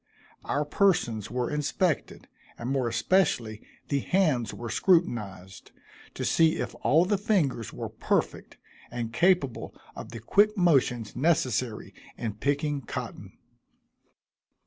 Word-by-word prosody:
Our 145 +1 -1
persons 145 - +1
were 125 +3 -2
inspected, 150 +2 -1 0.3
and 120 +3 -4
more 135 -3 0
especially 120 - +1 0.3
the 140 - +1
hands 155 - +1
were 120 -2 -6
scrutinized, 105 - 0 0.4
to - - -3
see 160 -1 +3
if - - -4
all 160 +5 +4
the 200 +1 0
fingers 170 - 0
were - - -6
perfect, - - -2 0.3
and 115 -2 -5
capable 170 -2 +1 0.2
of - - -8
the 115 - -8
quick 205 - +3
motions 135 - +2
necessary 130 -6 0 0.2
in 115 -3 -3
picking 145 +5 -1
cotton. 115 - -7
140 Hz, 120 wpm, -27 LUFS, 115-170 Hz, 0.4 s, all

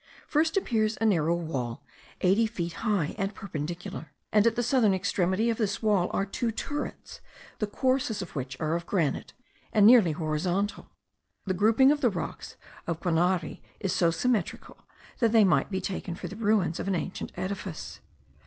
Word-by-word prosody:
First 320 +4 +1
appears 220 - +1
a 225 - +1
narrow 170 -5 +3
wall 135 -7 -4 0.4
eighty 200 +5 +3
feet 175 -7 -4
high, 200 -9 0
and 195 0 -2
perpendicular; 175 +1 -6 0.2
and 210 +1 +4
at 230 - +2
the 240 - 0
southern 240 -5 +3
extremity 190 +3 +1
of 225 - -4
this 205 -1 -1
wall 200 -5 +2
are 195 - 0
two 225 +4 -2
turrets, 290 +6 -5 0.4
the 215 - 0
courses 255 -1 0
of 185 -3 -7
which 130 -1 -5
are 155 0 0
of 170 0 -4
granite, 165 -9 -1 0.4
and 210 -2 +5
nearly 220 -8 +7
horizontal. 175 +6 -2 0.6
The 190 - 0
grouping 225 +8 +5
of 295 0 0
the 245 - +4
rocks 180 -5 -6 0.3
of 165 -1 -2
Guanari 175 0 0 0.2
is 195 -3 -1
so 175 -3 +3
symmetrical 200 +3 -1 0.4
that 230 -2 +2
they 225 -2 +7
might 190 - +3
be 190 -2 -2
taken 185 -2 -4
for - - -6
the 200 - -8
ruins 205 -6 +1
of - - -4
an 195 - +1
ancient 180 +2 -4
edifice. 185 -3 -5
195 Hz, 170 wpm, -28 LUFS, 170-220 Hz, 0.6 s, nearly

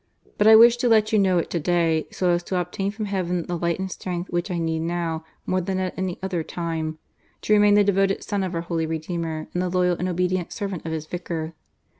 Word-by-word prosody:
But 210 - +4
I 220 - +10
wished 235 +2 +7
to 245 - +2
let 220 -1 +3
you 215 - +5
know 190 -2 +3
it 170 - -1
to 170 - 0
day, 165 -1 +1
so 180 -1 0
as 175 0 +1
to 185 - -1
obtain 180 +3 -2
from 215 +1 -4
Heaven 180 -3 -2
the 175 - -3
light 170 0 -1
and 190 0 -4
strength 180 -1 -5
which 175 +3 -1
I 180 - -2
need 165 -1 -1
now, 165 -1 -2 0.2
more 185 0 0
than 190 +1 -2
at 185 -1 -2
any 185 -2 -3
other 185 -3 -1
time, 160 -1 -4 0.5
to 215 - +2
remain 205 -1 +5
the 205 - +6
devoted 195 0 +1
son 205 -2 -2
of 185 -2 -3
our 165 - -1
Holy 165 -1 -2
Redeemer 160 0 -3
and 180 - 0
the 180 - -1
loyal 180 -1 +1
and 180 - -2
obedient 180 0 -1
servant 195 -6 -4
of - - -3
His 160 -1 -3
Vicar. 165 -1 -5
180 Hz, 240 wpm, -24 LUFS, 170-195 Hz, 0.5 s, I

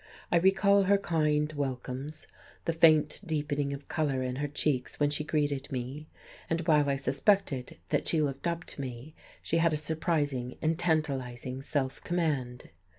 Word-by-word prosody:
I 175 - +5
recall 195 +2 +4
her 200 +1 +5
kind 155 -4 +1
welcomes, 135 +1 -4 0.4
the 165 - +1
faint 160 -1 +4
deepening 145 -4 -1
of 140 0 -7
colour 140 -5 0
in 125 0 -3
her 145 +1 -1
cheeks 140 -3 -1
when 145 0 +3
she 150 +1 0
greeted 145 -2 -1
me, 135 +4 -5 0.4
and 165 +1 0
while 150 -4 +3
I 140 - +2
suspected 140 0 +1
that - - 0
she 165 - +3
looked 140 +1 -1
up 170 0 -2
to 140 - -7
me 130 +3 -7 0.3
she 165 - 0
had 165 -1 +3
a - - +1
surprising 145 -5 -1
and 160 +1 0
tantalizing 135 -6 -1
self 135 -1 -2
command. 145 -8 -2
150 Hz, 160 wpm, -30 LUFS, 135-160 Hz, 0.4 s, I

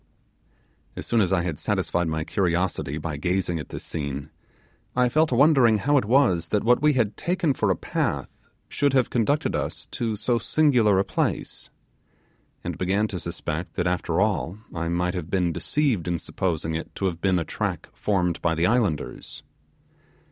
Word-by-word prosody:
As - - -6
soon 115 -2 +2
as 95 -3 +1
I 90 -2 +2
had 85 -5 -3
satisfied 85 -1 0
my 80 0 -1
curiosity 90 -5 -1
by 80 -1 -4
gazing 90 +1 -1
at 75 - -7
this - - -6
scene, 70 -2 -4 0.6
I 125 0 +3
fell 155 +5 +3
to 130 - -1
wondering 130 -5 +5
how 145 +8 +1
it 125 - -3
was 100 - +3
that 105 - 0
what 120 +3 +4
we 150 0 +4
had 110 -6 +1
taken 170 -4 0
for - - 0
a - - +3
path - - -3 0.2
should 140 -1 +1
have 130 -2 +2
conducted 140 +6 +1
us - - -3
to 115 -2 -2
so 115 +3 +1
singular 115 -4 +3
a 95 - +3
place, - - -2 0.9
and - - -5
began 100 +4 +1
to 90 - -4
suspect 85 0 -4
that 90 - 0
after 90 -1 0
all 95 -4 0 0.2
I 85 -1 -2
might 90 +1 0
have 90 -3 -5
been 90 -4 +1
deceived 130 - 0
in 85 -1 0
supposing 80 -1 -2
it 80 - -5
to 95 - -2
have 85 -3 -2
been 95 -2 +2
a 85 - -1
trick - - -3
formed 90 -4 0
by 80 -1 +1
the 80 +2 +1
islanders. 105 -8 -1
95 Hz, 180 wpm, -25 LUFS, 85-120 Hz, 0.9 s, wondering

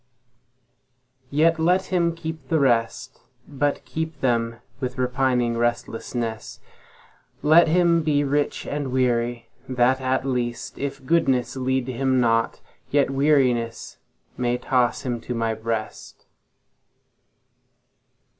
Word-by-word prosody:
Yet 160 +3 +3
let 180 +4 +2
him 170 -2 +2
keep 160 -4 -7
the 160 +3 +2
rest, 125 -1 0 0.3
But 145 0 -1
keep 160 -1 -4
them 115 -2 0 0.2
with 125 -1 -4
repining 125 -2 +1
restlessness; 120 -1 -3 0.8
Let 160 +3 +6
him 170 0 +3
be 150 -2 +1
rich 145 +1 -1
and 145 -3 -3
weary, 120 -2 0 0.2
that 130 +1 +2
at 130 0 0
least, 120 -3 -3
If 135 -1 -5
goodness 135 -6 +1
lead 130 -1 -1
him 130 +1 +1
not, 115 -1 +1 0.3
yet 145 -1 +2
wearinessMay 125 -3 -1
toss 125 -2 +1
him 120 -3 -3
to 125 - -5
My 115 -1 0
breast. 110 0 -5
130 Hz, 110 wpm, -23 LUFS, 120-145 Hz, 0.8 s, Let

